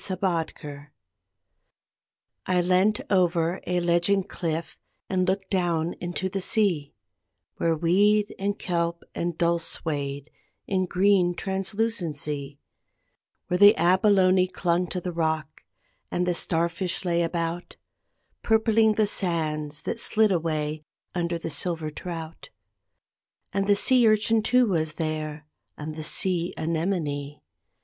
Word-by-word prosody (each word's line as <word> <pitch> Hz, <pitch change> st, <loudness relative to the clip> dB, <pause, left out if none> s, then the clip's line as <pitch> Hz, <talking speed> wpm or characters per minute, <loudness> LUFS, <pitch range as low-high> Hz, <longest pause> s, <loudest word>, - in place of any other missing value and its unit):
ATAVISM 165 Hz, -6 st, -3 dB, 1.6 s
I 185 Hz, -1 st, +2 dB
leant 185 Hz, +4 st, +2 dB
out -, -, -14 dB
over 175 Hz, -2 st, +2 dB
a 180 Hz, 0 st, +1 dB
ledging 175 Hz, +3 st, +2 dB
cliff 165 Hz, -3 st, -4 dB, 0.3 s
and 185 Hz, -1 st, 0 dB
looked 190 Hz, 0 st, -1 dB
down 175 Hz, -3 st, 0 dB
into 175 Hz, +2 st, -2 dB
the 195 Hz, +1 st, -3 dB
sea, 175 Hz, -, 0 dB, 0.6 s
Where 165 Hz, -1 st, +1 dB
weed 205 Hz, +6 st, +2 dB
and 200 Hz, +1 st, -1 dB
kelp 170 Hz, -1 st, -2 dB
and 170 Hz, -1 st, -3 dB
dulse 170 Hz, -1 st, +1 dB
swayed, 145 Hz, -2 st, -4 dB, 0.3 s
in 185 Hz, -1 st, 0 dB
green 185 Hz, -1 st, +3 dB
translucency; 180 Hz, -8 st, -2 dB, 0.9 s
Where 180 Hz, -, 0 dB
the 205 Hz, +1 st, +8 dB
abalone 185 Hz, +1 st, +4 dB
clung 180 Hz, -1 st, 0 dB
to 180 Hz, -, -3 dB
the 180 Hz, 0 st, -4 dB
rock 160 Hz, -2 st, -2 dB, 0.5 s
and 180 Hz, -, -1 dB
the 180 Hz, -, +1 dB
star 170 Hz, 0 st, +1 dB
fish 180 Hz, +2 st, -4 dB
lay 170 Hz, -1 st, +1 dB
about, 170 Hz, +1 st, -3 dB, 0.7 s
Purpling 220 Hz, -1 st, +3 dB
the 215 Hz, -, +3 dB
sands 155 Hz, -6 st, -2 dB
that -, -, -3 dB
slid 220 Hz, -2 st, +2 dB
away 155 Hz, -3 st, -1 dB, 0.3 s
under 170 Hz, -1 st, -1 dB
the 165 Hz, -1 st, -5 dB
silver 160 Hz, -2 st, -1 dB
trout. 165 Hz, -, -7 dB, 1.0 s
And 195 Hz, 0 st, 0 dB
the 205 Hz, -, +5 dB
sea 245 Hz, +3 st, +5 dB
urchin 215 Hz, +1 st, +3 dB
too 250 Hz, +3 st, +3 dB
was 160 Hz, -7 st, 0 dB
there, 155 Hz, -1 st, -4 dB, 0.3 s
and 155 Hz, +1 st, -6 dB
the 155 Hz, -, -6 dB
sea 175 Hz, +2 st, 0 dB
anemone. 155 Hz, -4 st, -2 dB
175 Hz, 125 wpm, -25 LUFS, 160-195 Hz, 1.6 s, the